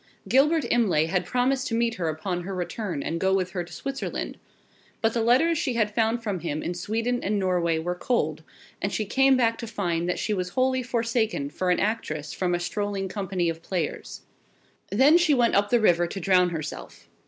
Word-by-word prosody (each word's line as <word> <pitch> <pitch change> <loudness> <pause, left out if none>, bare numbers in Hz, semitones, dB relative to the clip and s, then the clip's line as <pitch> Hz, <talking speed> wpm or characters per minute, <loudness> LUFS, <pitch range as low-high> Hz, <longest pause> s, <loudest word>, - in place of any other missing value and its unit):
Gilbert 300 +4 +3
Imlay 195 -10 +3
had 180 +2 -1
promised 260 +4 +1
to 230 - -1
meet 230 0 +1
her 175 -6 -2
upon 175 +3 -3
her 190 +2 -5
return, 180 -3 -3
and 170 - -2
go 190 +1 +2
with 185 -1 -1
her 180 -2 -3
to 175 - -14
Switzerland. 275 0 -4 0.6
But 225 0 +1
the 235 - 0
letters 275 +8 +3
she 255 - -1
had 215 -2 +1
from 225 -3 0
him 155 -2 -3
in 175 - -2
Sweden 230 +7 -2
and 205 +2 0
Norway 180 -4 +1
were 175 +2 -2
cold, 160 - -1 0.4
and 200 - -1
she 215 - -1
came 270 +5 +4
back 230 -2 +1
to 235 - -5
find 175 -5 -2
that 180 - 0
she 215 - -1
was 180 -2 -2
wholly 260 +5 +1
forsaken 230 - -1
for 185 +4 -2
an 180 - +3
actress 155 -9 -2
from 180 -2 0
a - - -2
strolling 195 +2 -3
company 190 -3 -2
of 165 0 -3
players. 170 -3 -4 0.7
Then 275 - +5
she 315 -4 +3
went 240 -2 +3
up 205 +1 +3
the 240 - +4
river 175 -5 +3
to 195 - -6
drown 180 0 +3
herself. 155 -3 -7
200 Hz, 200 wpm, -26 LUFS, 175-235 Hz, 0.7 s, Then